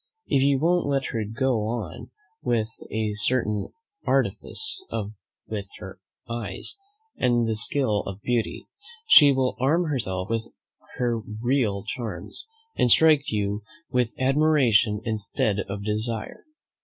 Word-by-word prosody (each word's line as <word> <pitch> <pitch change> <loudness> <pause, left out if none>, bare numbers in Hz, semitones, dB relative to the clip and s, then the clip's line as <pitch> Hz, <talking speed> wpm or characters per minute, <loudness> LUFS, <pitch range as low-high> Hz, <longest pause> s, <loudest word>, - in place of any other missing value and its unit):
If 135 - +2
you 140 0 +4
won't 170 +4 +2
let 135 -1 0
her 115 -2 -1
go 115 0 0
on 115 -1 -5 0.3
with 115 -2 0 0.2
a 110 -1 -1
certain 105 -1 +1 0.4
artifice 415 -4 -1 0.6
with 100 -2 -5
her - - -10 0.3
eyes, 115 - -5 0.4
and 120 -1 +2
the 110 - +1
skill 110 -1 +2
of 100 0 -6
beauty, 120 -2 -1 0.4
she 145 - +8
will 130 -1 +1
arm 150 +7 +3
herself 95 -9 -2
with 115 0 -2 0.5
her 120 -2 0
real 110 -1 -1
charms, 110 - -6 0.3
and 125 - +2
strike 150 +1 +5
you 105 -1 -1 0.3
with 125 -3 0
admiration 130 -6 +3
instead 105 -2 -1
of 100 +1 -4
desire. 110 - -2
115 Hz, 125 wpm, -25 LUFS, 105-135 Hz, 0.6 s, she